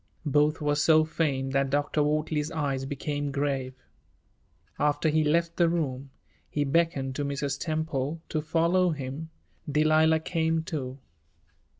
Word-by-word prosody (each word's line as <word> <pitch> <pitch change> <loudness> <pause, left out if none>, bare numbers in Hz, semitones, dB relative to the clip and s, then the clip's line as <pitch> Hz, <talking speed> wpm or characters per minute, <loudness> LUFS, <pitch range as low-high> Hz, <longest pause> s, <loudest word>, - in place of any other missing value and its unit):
Both 150 +2 +2
were 150 -1 +1
so 155 +1 +4
faint 140 -4 -1
that 135 0 +2
Dr. 145 +2 +1
Wortley's 150 0 0
eyes 140 -4 -2
became 145 +1 -3
grave. 135 -2 -2 1.0
After 150 +2 +2
he 155 +1 +2
left 165 +3 +1
the 170 -2 +4
room, 140 -5 -2 0.4
he 145 - 0
beckoned 140 -3 +1
to 145 - -1
Mrs. 140 0 -2
Temple 155 -2 -2
to 155 - -1
follow 170 +4 +2
him. 145 +1 -5 0.4
Delilah 155 +1 +4
came, 160 -1 0
too. 135 -5 -5
150 Hz, 130 wpm, -27 LUFS, 140-160 Hz, 1.0 s, so